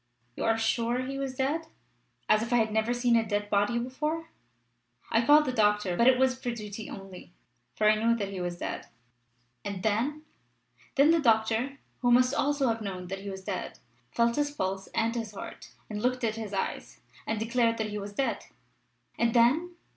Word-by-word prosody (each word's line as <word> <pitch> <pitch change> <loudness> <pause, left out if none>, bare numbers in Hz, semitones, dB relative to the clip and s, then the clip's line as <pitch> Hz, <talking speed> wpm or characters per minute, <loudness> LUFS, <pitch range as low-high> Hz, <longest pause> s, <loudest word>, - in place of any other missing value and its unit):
"You - - -3
are 225 0 +3
sure 235 +2 0
he 275 +1 -4
was 270 -1 -3
dead?" 295 +5 -1 0.6
"As 215 - +4
if 230 - -4
I - - +4
had 220 -2 +2
never 220 +2 +1
seen 240 -1 +2
a 230 - +4
dead 205 -1 -2
body 205 +4 +2
before! 300 +7 -3 0.8
I 225 - +3
called 295 +4 +6
the 255 - -1
doctor, 210 -5 +2
but 235 +6 +4
it 260 -1 +6
was 260 0 +3
for 245 - -2
duty 215 -2 -6
only, 190 -2 -10 0.4
for 215 - +2
I 215 - +7
knew 230 0 +4
that 200 -4 -3
he 190 -2 -5
was 175 -1 -3
dead." - - -5 0.8
"And 200 -2 -5
then?" 250 +9 0 0.7
"Then 290 +3 +6
the 335 - +4
doctor 230 +1 +2 0.2
who 245 - +1
must 250 +2 +5
also 285 -1 +1
have 225 0 -1
known 185 -3 -5
that 195 0 -4
he 200 +1 -7
was 190 -1 -7
dead 190 -2 -4 0.3
felt 235 - +1
his 290 0 +1
pulse 195 -8 -3
and 225 0 +1
his 225 -3 -4
heart, - - -9 0.2
and 210 -1 -5
looked 250 +1 0
at 220 -2 +1
his 220 -3 -6
eyes, 195 -1 -4 0.3
and 220 -1 -1
declared 230 0 +1
that 220 -1 -2
he 210 - -3
was 205 0 -7
dead." 270 +6 -1 0.7
"And 235 0 +2
then?" 300 +10 +3
230 Hz, 200 wpm, -29 LUFS, 210-255 Hz, 0.8 s, I